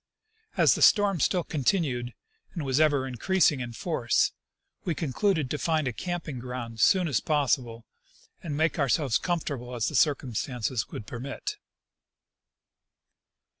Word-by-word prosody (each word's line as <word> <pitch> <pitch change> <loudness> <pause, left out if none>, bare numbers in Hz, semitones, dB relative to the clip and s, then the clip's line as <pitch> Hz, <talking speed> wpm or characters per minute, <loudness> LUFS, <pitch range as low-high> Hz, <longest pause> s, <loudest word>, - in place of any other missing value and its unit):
As - - +5
the - - -3
storm 200 -4 +5
still 175 +5 +2
continued, 135 -6 -1 0.4
and 165 -5 -3
was 135 +2 +2
even 145 -3 +3
increasing 145 +4 +2
in 120 -2 -5
force, 120 -2 0 0.5
we 170 - -1
con 145 -5 -3
cluded 185 -7 +1
to 150 - -2
find 155 -4 0
a 125 - -2
camping 165 -2 -4
ground 120 -2 -6
soon 180 - +4
as 135 -9 +1
possible 125 -6 0 0.6
and 150 -4 -4
make 160 +1 +1
our 140 -2 +1
selves 130 -2 +2
comfortable 140 -8 -3
as 115 -1 0
the - - -6
circumstances 125 -5 0
would 105 - -7
permit. 140 - -6
140 Hz, 140 wpm, -27 LUFS, 125-165 Hz, 0.6 s, As